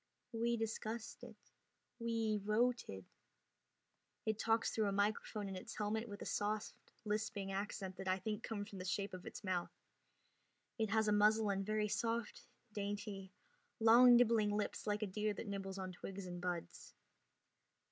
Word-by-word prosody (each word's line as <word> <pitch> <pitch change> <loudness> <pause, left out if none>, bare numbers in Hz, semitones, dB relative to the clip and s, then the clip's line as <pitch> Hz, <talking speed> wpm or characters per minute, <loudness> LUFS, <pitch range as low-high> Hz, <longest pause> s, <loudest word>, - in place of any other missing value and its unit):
"We 235 +1 +1
discussed 225 0 -4
it... - - -10 0.6
we 225 -2 +1
voted...." 215 - +1 1.2
It 220 -1 0
talks 225 0 +2
through 220 -2 +1
a - - +1
microphone 205 +1 0
in 195 - -4
its 185 +5 -7
helmet 220 +2 -1
with 205 0 -6
a - - -8
soft 210 +1 -1 0.3
lisping 210 -2 -1
accent 195 -1 -3
that 190 - -5
I 185 0 +3
think 210 +3 -3
comes 205 -3 -4
from 195 - -7
the 185 - -5
shape 200 +1 -1
of 185 -1 -7
its - - -7
mouth. 185 -3 0 1.1
It 220 -1 +1
has 220 0 +3
a - - +4
muzzle 210 0 +5
and 195 0 0
very 215 +1 +1
soft, 230 0 -2 0.3
dainty, 205 -1 -4 0.5
long 240 +2 +9
nibbling 230 -3 +5
lips 210 - -2
like 210 +1 +1
a - - +2
deer 210 +2 -1
that - - -5
nibbles 195 -1 -4
on 190 -1 -4
twigs 190 +2 -6
and 175 -1 -6
buds. 175 -2 -4
210 Hz, 160 wpm, -38 LUFS, 195-220 Hz, 1.2 s, long